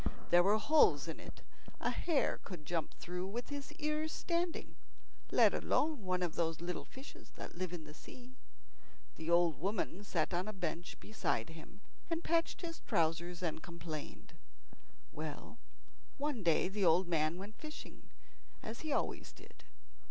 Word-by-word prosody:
There 175 0 +9
were 200 +4 +5
holes 305 +8 +5
in - - -4
it - - -10 0.4
a - - +1
hare 325 -5 +2
could 175 -6 -7
jump 165 0 -1
through 180 +1 -4
with 235 +5 -4
his 285 -1 -5
ears 305 +1 -1
standing, 340 +1 -1 0.6
let - - +7
alone 300 -4 +2
one 185 0 +1
of 170 -3 0
those 165 -1 0
little 175 +1 -3
fishes 265 +1 -11
that - - -7
live 185 0 -3
in 175 -3 -5
the 150 0 -10
sea. 250 +9 -12 0.8
The 160 +1 -4
old 170 -2 +5
woman 200 +2 -1
sat 175 -3 0
on 175 +2 +1
the 215 - -4
bench 175 -3 -3
beside 165 - -1
him, 165 +5 -12 0.3
and 330 0 -1
patched 330 0 +2
his 330 -2 -4
trousers 170 +2 +1
and 160 -2 -1
complained. 165 -3 -7 0.8
Well, 155 +9 -6 0.6
one 285 -5 -1
day 170 -1 +4
the 200 +1 -1
old 175 +1 +5
man 160 0 +2
went 205 +3 -8
fishing, 310 0 -9 0.5
as 225 +3 -5
he 315 - -3
always - - 0
did. - - -16
185 Hz, 160 wpm, -36 LUFS, 170-260 Hz, 0.8 s, There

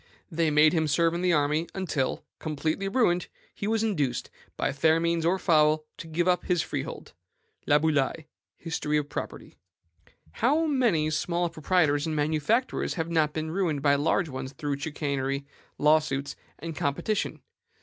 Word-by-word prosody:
They 165 -1 +1
made 150 +1 +5
him 160 -2 +1
serve 165 +3 +2
in 170 - -2
the 180 -1 +2
army 150 +2 +1
until, 160 -8 -2
completely 155 +5 -2
ruined, 195 -5 +2 0.3
he 200 - -4
was 225 0 +1
induced, 150 - -1 0.3
by - - 0
fair 160 +4 +3
means 170 0 +1
or 185 +2 +2
foul, 155 -3 +3
to 170 - -8
give 170 +2 -1
up 180 -1 +2
his 175 -3 +1
freehold." - - -6 0.5
Laboulaye: 150 0 +2 0.3
History 155 -2 -1
of 145 -1 -2
Property. - - -6 0.7
How 295 - +2
many 230 - +2
small 170 +2 -1
proprietors 155 -2 +1
and 155 - -2
manufacturers 155 - 0
have 165 -1 -3
not 155 -2 +2
been 155 +1 -3
ruined 165 -6 -1
by 140 -1 +5
large 160 +5 +1
ones 130 -1 -6
through 140 0 -3
chicanery, 140 -2 -2 0.3
law 150 +1 +5
suits, 140 -2 -4 0.2
and 165 -1 -6
competition? 145 +10 -2
155 Hz, 155 wpm, -27 LUFS, 145-175 Hz, 0.7 s, made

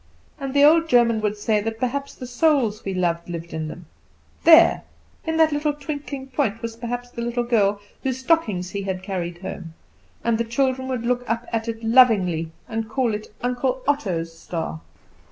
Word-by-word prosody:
And 275 0 -5
the 285 - +6
old 325 +2 +6
German 235 -3 +4
would 210 0 -1
say 210 0 +1
that 220 +1 -3
perhaps 275 +3 -2
the 255 - -8
souls 245 -4 +1
we 195 - -3
loved 170 -1 -1
lived 170 -1 -6
in 160 -1 -3
them; 165 +2 -9 0.6
there, 335 +1 +7 0.5
in 320 0 0
that 320 -1 +5
little 295 0 0
twinkling 285 -2 -6
point 255 -5 -1
was 230 -1 -4
perhaps 245 +1 -5
the 235 - -6
little 240 +1 -1
girl 210 -4 +2 0.2
whose 260 -2 -1
stockings 225 - 0
he 200 - -3
had 190 -1 -4
carried 175 -3 -4
home; 165 -4 -7 0.5
and 230 -1 +1
the - - +2
children 260 +2 0
would 250 -3 -3
look 245 0 +1
up 230 +1 -1
at 225 0 -1
it 225 0 -5
lovingly, 205 -9 +4 0.2
and 225 -2 -3
call 240 -1 0
it 210 +1 -5 0.2
"Uncle 250 +1 -1
Otto's 180 - -1
star." 160 - -5
235 Hz, 185 wpm, -23 LUFS, 200-265 Hz, 0.6 s, there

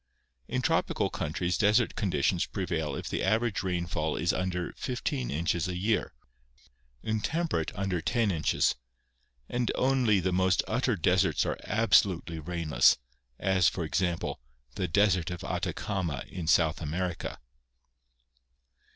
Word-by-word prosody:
In - - -2
tropical - - +1
countries 85 +4 -2
desert 105 +3 +3
conditions 90 -2 0
prevail 80 -6 -2
if - - -5
the - - -2
average 110 +1 +1
rainfall 85 -4 -1
is 85 +2 +1
under 90 -1 -2
15 130 +1 -3
inches 85 +3 0
a 90 -1 -3
year, 105 +4 0 0.9
in 110 0 -1
temperate 160 - -1
under 95 -4 -1
10 115 - +1
inches, 80 -4 +2 0.7
and 120 -1 -1
only 125 -6 +3
the 90 0 0
most 95 0 +3
utter 120 +1 +1
deserts 85 - +2
are - - -2
absolutely 95 -7 +2
rainless, 85 0 +3 0.4
as, 95 -2 +3
for 90 - -4
example, 85 -3 -1 0.3
the 90 +8 -2
desert 90 -1 +2
of 90 -1 -6
Atacama 85 -10 -2
in 90 -4 -6
South 80 -1 +3
America. 85 +3 -3
90 Hz, 125 wpm, -29 LUFS, 85-105 Hz, 0.9 s, desert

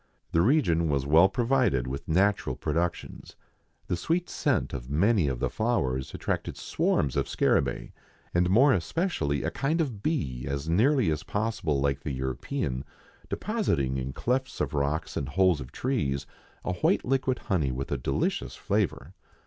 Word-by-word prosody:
The 85 - +3
region 85 - +3
was 70 -2 0
well 80 +6 +6
provided 120 - +1
with 65 +2 -5
natural 95 +5 +2
productions. 85 0 -3 0.5
The - - -1
sweet 170 - -1
scent - - 0
of - - -6
many 95 +3 +3
of 65 -3 -1
the - - +1
flowers 65 - -1
attracted - - -3
swarms 70 -4 0
of - - 0
scarabaei, - - +1 0.4
and 90 +1 +2
more 130 +8 +6
especially 85 - -1
a - - -1
kind 150 +6 0
of 125 -11 -2
bee 65 - -2
as 70 +2 -3
nearly 115 - +3
as 75 -1 -1
possible 100 -9 -1
like 70 0 +1
the 70 +1 -4
European, 65 - -3 0.5
depositing 80 - 0
in 65 0 -3
clefts 130 - -2
of - - -1
rocks 75 +3 -1
and 70 - -2
holes 90 0 +3
of 60 - -9
trees 70 - -1 0.4
a 95 - 0
white 90 - +1
liquid 130 0 +1
honey 80 -9 0
with 65 +2 -4
a - - +1
delicious - - -1
flavour. 65 +7 -1
85 Hz, 155 wpm, -28 LUFS, -, 0.5 s, well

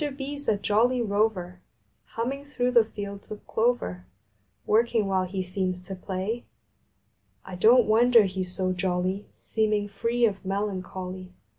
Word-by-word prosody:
BEE 275 +1 -4
S 285 0 -6
a 210 - +3
jolly 230 +5 +2
rover, 200 -5 0 0.6
Humming 265 +5 -2
through 250 -4 -1
the 235 -2 +6
fields 200 -2 -8
of 215 - -8
clover, 220 - -1 0.6
Working 225 0 +2
while 190 -1 +1
he 185 +1 -3
seems 185 0 -2
to 185 +2 -7
play. 190 +5 -4 1.0
I 190 - -9
don 225 +8 +6
t - - -8
wonder 230 +1 +6
he 190 -1 -2
s 180 - -3
so 185 0 -1
jolly, 185 +2 -1
Seeming 210 -2 -1
free 230 +4 +1
of 200 -3 -1
melancholy. 185 -2 -4
205 Hz, 150 wpm, -26 LUFS, 185-230 Hz, 1.0 s, the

